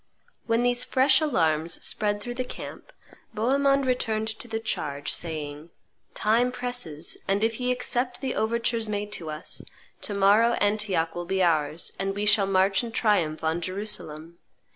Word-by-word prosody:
When 230 +1 +2
these 245 0 +2
fresh 265 +2 +4
alarms 165 - +1
spread 205 -1 +1
through 240 +3 -5
the 255 +1 -2
camp, 250 - -9 0.4
Bohemond 275 +4 +2
returned 220 -4 0
to 220 +2 -6
the 225 -1 -3
charge, 145 -10 -3
saying, 155 -1 -5 0.5
"Time 235 +4 +2
presses; 245 -11 -3
and 200 +2 +1
if 225 +1 0
ye 250 0 +1
accept 250 0 -1
the 265 -2 -2
overtures 230 0 0
made 205 0 -3
to 165 -5 -3
us, 155 0 -5 0.4
to 205 - -4
morrow 205 +4 +5
Antioch 205 -6 +1
will 175 0 -4
be 190 +1 +1
ours, 155 -1 0
and 195 0 -1
we 205 +1 -1
shall 205 -1 +4
march 195 +2 +3
in 235 - -5
triumph 175 -9 +1
on 160 +2 0
Jerusalem. 170 -4 -3
210 Hz, 160 wpm, -26 LUFS, 170-240 Hz, 0.5 s, morrow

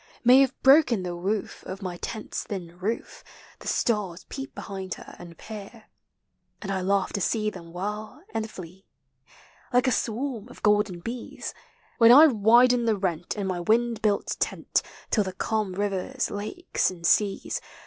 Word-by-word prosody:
May 250 +2 +8
have 270 -1 +2
broken 265 -7 +6
the 175 -1 -4
woof 195 +4 -3
of 190 +2 -6
my 180 -2 -4
tent's 220 +4 -5
thin 175 -4 -6
roof, 215 +5 -4 0.4
The - - -10
stars 195 -6 0
peep 270 0 -7
behind 190 -2 -5
her - - -12
and 170 -2 -11
peer; 215 +1 -10 0.7
And 195 - -5
I 190 -1 -1
laugh 195 +1 +1
to 200 - -1
see 215 +2 0
them 170 -3 -11
whirl 210 - -5
and 220 0 -2
flee. 185 0 -11 0.8
Like 250 +1 +3
a 255 - +3
swarm 235 0 -2
of - - -14
golden 210 -4 +2
bees, 235 +5 -6 0.5
When 230 0 +8
I 290 +6 +10
widen 240 0 +5
the 220 -2 +2
rent 175 -3 -2
in 200 - -2
my 185 -2 -2
wind 225 +4 +1
built 205 -2 0
tent, - - 0 0.3
Till 210 - +3
the 190 -1 -5
calm 210 0 -1
rivers, 205 +6 -2
lakes, 215 - -1
and 175 -2 -8
seas. 200 +3 +2
210 Hz, 165 wpm, -26 LUFS, 185-235 Hz, 0.8 s, I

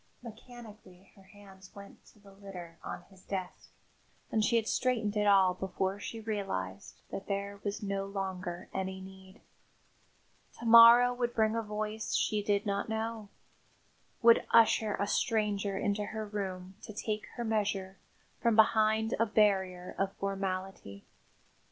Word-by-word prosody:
Mechanically 220 -5 -13
her 195 - -18
hands 195 -1 -16
went 200 0 -13
to - - -21
the 200 -1 -17
litter 180 -4 -10
on 175 - -6
his 190 -1 -18
desk 185 -2 -6 0.6
and 220 - +2
she 235 - +2
had 225 -1 +1
straightened 230 -5 0
it 210 0 +1
all 190 -2 +5
before 190 +1 -3
she 225 +2 -6
realised 145 - -5
that 195 - -6
there 200 0 -3
was 205 +1 -4
no 195 -1 -2
longer 185 -3 -5
any 190 0 -3
need. 190 0 -13 1.2
To 235 - -9
morrow 235 +2 +8
would 240 -1 -2
bring 220 0 +2
a 230 - 0
voice 215 0 -4
she 210 -1 +1
did 205 0 0
not 200 +1 -2
know; 220 -1 -3 0.9
would 230 0 +6
usher 220 -2 +4
a 200 - -1
stranger 205 -2 0
into 205 +1 -1
her 220 +1 -5
room 190 -3 -5
to 215 - -9
take 215 0 -4
her 240 - -3
measure 200 -4 -1 0.4
from 235 -2 +2
behind 220 0 +3
a 230 - +3
barrier 190 -4 +1
of 195 0 0
formality. 190 - -5
205 Hz, 145 wpm, -31 LUFS, 190-220 Hz, 1.2 s, morrow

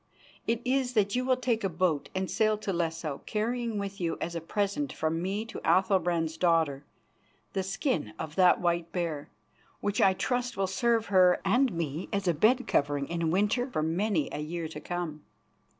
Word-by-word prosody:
It 230 +1 0
is 255 -1 +1
that 205 -2 +2
you 250 - +1
will 255 -1 +3
take 240 -4 0
a 195 - +1
boat 170 -4 0
and 190 0 0
sail 215 +1 +2
to 205 -2 -3
Lesso, 165 -4 -2
carrying 230 +1 -1
with 200 -1 -4
you 165 -1 -1
as 170 - -3
a 170 - -3
present 205 - -1
from 160 +1 -1
me 200 +4 -2
to 230 - -7
Athalbrand's 175 -4 +2
daughter 160 -6 +2 0.7
the 190 - 0
skin 190 - -2
of 155 -2 -5
that 180 +1 +5
white 170 -1 0
bear, 160 -5 -3 0.5
which 205 0 -1
I 190 - +6
trust 245 +3 -2
will 195 - +1
serve 225 +4 +1
her 180 -1 +6
and 245 +6 +3
me 165 -1 -3
as 200 -1 -1
a 175 - +4
bed 240 - +3
covering 140 -1 0
in 170 -1 -1
winter 210 +8 +1
for 155 -11 -1
many 170 0 0
a - - -4
year 160 +2 -4
to 150 - -7
come. 170 -2 -4
185 Hz, 185 wpm, -29 LUFS, 165-215 Hz, 0.7 s, I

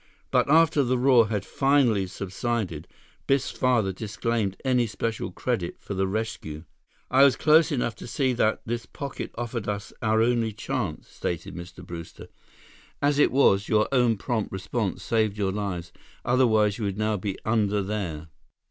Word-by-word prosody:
But - - +2
after 160 -1 +5
the 130 0 +1
roar 125 -3 +5
had 105 -2 -2
finally 135 -8 +2
subsided, 95 -3 -3 0.4
Biff's 135 -1 +2
father 120 -7 +1
disclaimed 105 0 -2
any 125 -2 +2
special 110 -3 -3
credit 95 -3 -2
for - - -6
the 95 0 0
rescue. 95 -7 -4 0.5
"I 135 +2 +6
was 140 -2 +6
close 160 +2 +4
enough 120 -4 0
to - - -9
see 130 +1 0
that 110 -2 +1
this 120 +1 -3
pocket 140 -2 -6
offered 115 -3 -3
us 105 0 -4
our 110 0 +3
only 115 -2 +1
chance," 110 -6 -4
stated 85 +3 -4
Mr. 90 +1 -9
Brewster. 85 -2 -9 0.7
"As 145 0 +2
it - - +5
was, 100 -7 +3
your 105 -1 +3
own 125 -4 +3
prompt 110 0 -2
response 95 +2 -3
saved 110 -3 +1
your 100 -2 0
lives. 90 -4 -4 0.3
Otherwise, 115 -4 +3
you 110 - -2
would 100 -1 -2
now 110 0 0
be 100 -1 -3
under 105 -2 +1
there." 90 -6 -4
110 Hz, 160 wpm, -26 LUFS, 95-125 Hz, 0.7 s, I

